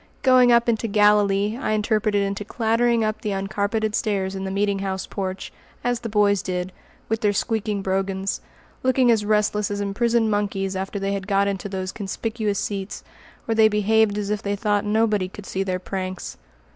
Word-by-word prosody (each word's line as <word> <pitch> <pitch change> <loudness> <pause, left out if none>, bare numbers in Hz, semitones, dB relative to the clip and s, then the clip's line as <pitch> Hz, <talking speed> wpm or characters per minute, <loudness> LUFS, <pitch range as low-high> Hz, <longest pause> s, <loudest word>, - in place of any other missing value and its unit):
"Going 255 -2 +6
up 235 0 +4
into 230 -1 +1
Galilee" 210 +1 +3
I 215 - 0
interpreted 215 -1 +1
into 200 +1 -2
clattering 230 +1 +1
up 215 0 -2
the 210 -2 -2
uncarpeted 200 +3 -1
stairs 195 -3 -1
in 195 0 -4
the - - -3
meeting 200 0 0
house 190 -1 -3
porch, 190 -1 -5 0.3
as 245 -1 0
the 230 - -5
boys 205 -2 +3
did, 180 0 -3 0.4
with 225 0 -1
their 205 -1 +2
squeaking 210 -1 -1
brogans, 195 0 -1 0.4
looking 255 -1 +3
as 220 -2 +2
restless 210 0 +1
as 205 0 -3
imprisoned 225 +3 +1
monkeys 195 -2 -1
after 190 +2 -3
they 195 0 -1
had 195 -1 -4
got 200 -1 +2
into 200 0 -3
those 190 -1 -3
conspicuous 215 +1 -3
seats, 195 -1 -4 0.4
where 225 - 0
they 220 0 +6
behaved 210 0 +2
as 205 0 -2
if 210 0 -1
they 205 -2 -1
thought 205 0 0
nobody 210 -2 +1
could 200 +1 -11
see 190 - -3
their 185 -1 -1
pranks. 185 0 -5
205 Hz, 185 wpm, -23 LUFS, 195-220 Hz, 0.4 s, Going